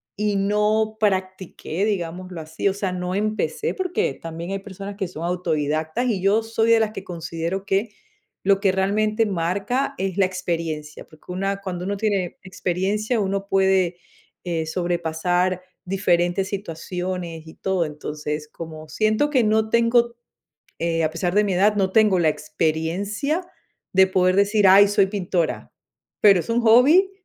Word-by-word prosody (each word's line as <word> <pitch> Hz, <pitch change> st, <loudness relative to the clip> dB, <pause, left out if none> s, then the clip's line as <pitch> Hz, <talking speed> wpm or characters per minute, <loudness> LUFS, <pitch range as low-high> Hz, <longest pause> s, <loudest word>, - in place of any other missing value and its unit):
y 210 Hz, 0 st, 0 dB
no 210 Hz, +2 st, +1 dB
practiqué, 185 Hz, -3 st, -2 dB
digámoslo 180 Hz, -3 st, -3 dB
así. 160 Hz, +4 st, -3 dB
O -, -, -1 dB
sea, 200 Hz, -2 st, -2 dB
no 180 Hz, 0 st, -3 dB
empecé 215 Hz, -, -1 dB
porque 365 Hz, -, -1 dB
también 165 Hz, +4 st, -7 dB
hay 195 Hz, -, -2 dB
personas 200 Hz, 0 st, -8 dB
que 195 Hz, -2 st, -3 dB
son 170 Hz, -2 st, -8 dB
autodidactas, 160 Hz, -, -1 dB
y 210 Hz, -6 st, 0 dB
yo 205 Hz, +4 st, +3 dB
soy 225 Hz, 0 st, 0 dB
de 230 Hz, -, +6 dB
las 220 Hz, -1 st, +1 dB
que 215 Hz, -, -7 dB
considero 170 Hz, +2 st, -4 dB
que 195 Hz, +4 st, 0 dB, 0.5 s
lo 195 Hz, 0 st, +3 dB
que 195 Hz, -1 st, +3 dB
realmente 215 Hz, +4 st, +1 dB
marca 200 Hz, +9 st, -1 dB
es 190 Hz, -1 st, -2 dB
la 195 Hz, -, +4 dB
experiencia. 165 Hz, -5 st, -4 dB
Porque 155 Hz, +3 st, -14 dB
una 195 Hz, +2 st, -2 dB
cuando 180 Hz, -2 st, -5 dB
uno 200 Hz, +1 st, -2 dB
tiene 195 Hz, -4 st, -1 dB
experiencia, 195 Hz, +5 st, -1 dB
uno 195 Hz, 0 st, -1 dB
puede, 190 Hz, -2 st, +2 dB, 0.5 s
eh, 165 Hz, -3 st, -2 dB
sobrepasar 175 Hz, +1 st, 0 dB, 0.2 s
diferentes 180 Hz, 0 st, +1 dB
situaciones 180 Hz, -3 st, -5 dB
y 160 Hz, -, -12 dB
todo. 190 Hz, -2 st, 0 dB
Entonces, 150 Hz, 0 st, -5 dB
como 155 Hz, 0 st, -9 dB
siento 215 Hz, -, +1 dB
que 260 Hz, -5 st, +3 dB
no 220 Hz, 0 st, +2 dB
tengo 235 Hz, 0 st, +3 dB, 0.6 s
eh, 165 Hz, -1 st, 0 dB
a 155 Hz, -, +1 dB
pesar 175 Hz, +2 st, -2 dB
de 210 Hz, +1 st, +4 dB
mi 195 Hz, -3 st, 0 dB
edad, 205 Hz, +3 st, +4 dB
no 190 Hz, -2 st, +1 dB
tengo 210 Hz, -2 st, +4 dB
la 165 Hz, -2 st, +3 dB
experiencia 170 Hz, -, -2 dB, 0.5 s
de 190 Hz, 0 st, +6 dB
poder 185 Hz, -1 st, +2 dB
decir: 205 Hz, 0 st, +4 dB
"Ay, 200 Hz, +2 st, +8 dB
soy 200 Hz, -1 st, +3 dB
pintora", 185 Hz, -4 st, -2 dB, 0.5 s
pero 200 Hz, -4 st, +6 dB
es -, -, -9 dB
un 230 Hz, +1 st, +2 dB
hobby, 275 Hz, -, +6 dB
190 Hz, 155 wpm, -23 LUFS, 170-210 Hz, 0.6 s, Ay